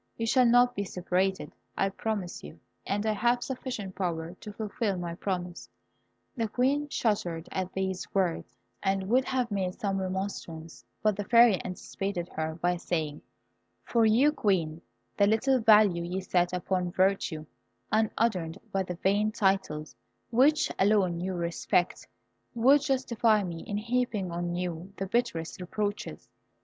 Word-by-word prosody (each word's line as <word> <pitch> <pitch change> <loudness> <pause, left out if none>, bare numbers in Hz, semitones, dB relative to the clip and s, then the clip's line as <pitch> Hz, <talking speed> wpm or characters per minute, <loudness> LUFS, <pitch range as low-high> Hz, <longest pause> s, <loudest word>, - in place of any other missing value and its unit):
You 230 - -1
shall 250 +2 +4
not 245 +1 +5
be 200 - -2
separated, 185 +1 -1 0.2
I 195 - +2
promise 200 -3 -4
you; 75 +3 -11 0.3
and 205 +2 -1
I 220 - +2
have 240 +3 +1
sufficient 245 -7 -5
power 170 -3 -3
to 210 +3 -10
fulfil 210 -1 -2
my 175 -1 -4
promise." 180 -1 -4 0.7
The 230 -4 -1
Queen 275 +6 +1
shuddered 180 - -1
at 185 -1 -3
these 190 -1 -3
words, 185 -4 -1 0.2
and 195 -1 0
would 255 +3 +3
have 250 -3 -1
made 185 -3 -1
some 195 -4 -1
remonstrance, 185 -6 -5 0.2
but 215 -2 +3
the 205 - -3
Fairy 235 -2 +5
anticipated 185 -1 -4
her 160 0 -3
by 175 +1 0
saying, 155 -4 -3 0.6
"For 230 -1 +2
you, 235 +7 +5
Queen, 175 - 0 0.4
the 200 - +5
little 250 +5 +3
value 210 -6 +5
you 180 +2 -3
set 180 -1 +1
upon 180 0 -1
virtue, 185 -4 +1 0.5
unadorned 215 -5 +1
by 195 - +1
the 180 -1 -4
vain 205 +4 +1
titles 190 - 0 0.4
which 285 +6 +4
alone 190 -4 +3
you 185 +1 -3
respect, 170 +1 0 0.5
would 265 +5 +5
justify 240 -6 +2
me 170 -3 -5
in 205 - -2
heaping 230 -4 -1
on 175 0 -2
you 180 +1 -4
the 195 - -2
bitterest 195 -5 -2
reproaches. 205 +3 -4
195 Hz, 145 wpm, -29 LUFS, 175-225 Hz, 0.7 s, not